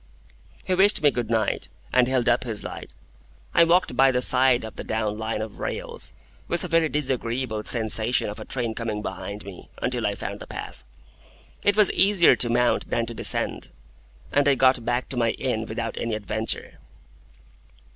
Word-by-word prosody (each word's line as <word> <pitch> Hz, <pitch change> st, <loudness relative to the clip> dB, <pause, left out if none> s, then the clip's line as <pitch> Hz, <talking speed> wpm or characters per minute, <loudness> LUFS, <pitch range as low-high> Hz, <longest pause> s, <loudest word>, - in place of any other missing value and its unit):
He 185 Hz, -, -1 dB
wished 195 Hz, -2 st, +3 dB
me 145 Hz, -, +5 dB
good 120 Hz, -4 st, -3 dB
night, 110 Hz, -2 st, -1 dB, 0.2 s
and 125 Hz, -1 st, +4 dB
held 130 Hz, -2 st, 0 dB
up 120 Hz, +1 st, +3 dB
his 115 Hz, -4 st, -4 dB
light. -, -, -8 dB, 0.6 s
I -, -, +6 dB
walked 170 Hz, -5 st, +2 dB
by 135 Hz, +1 st, +5 dB
the 125 Hz, -, 0 dB
side 125 Hz, -1 st, +4 dB
of 110 Hz, -, -9 dB
the -, -, -6 dB
down 110 Hz, -1 st, -2 dB
Line 110 Hz, -1 st, -2 dB
of 110 Hz, -, -9 dB
rails -, -, -4 dB, 0.3 s
(with 170 Hz, -, -1 dB
a -, -, -3 dB
very 165 Hz, -2 st, +2 dB
disagreeable 130 Hz, -5 st, -2 dB
sensation 115 Hz, +1 st, +2 dB
of 105 Hz, -, -6 dB
a -, -, -8 dB
train 120 Hz, -4 st, -3 dB
coming 110 Hz, -2 st, -4 dB
behind 105 Hz, 0 st, -6 dB
me) 100 Hz, -3 st, -11 dB
until -, -, -1 dB
I -, -, -2 dB
found -, -, -6 dB
the -, -, -10 dB
path. -, -, -8 dB, 0.8 s
It 205 Hz, 0 st, +2 dB
was 210 Hz, -3 st, +5 dB
easier 195 Hz, -3 st, +4 dB
to 120 Hz, -, +3 dB
mount 120 Hz, +1 st, +1 dB
than 115 Hz, -, 0 dB
to 115 Hz, -, -7 dB
descend, -, -, +2 dB, 0.6 s
and 145 Hz, 0 st, +2 dB
I 140 Hz, -, +4 dB
got 130 Hz, -2 st, +3 dB
back 120 Hz, +2 st, -1 dB
to 130 Hz, -, -4 dB
my 115 Hz, -1 st, +1 dB
inn 115 Hz, -4 st, -3 dB
without 115 Hz, +1 st, -4 dB
any 115 Hz, -2 st, -2 dB
adventure. 105 Hz, -3 st, -2 dB
120 Hz, 185 wpm, -24 LUFS, 110-135 Hz, 0.8 s, I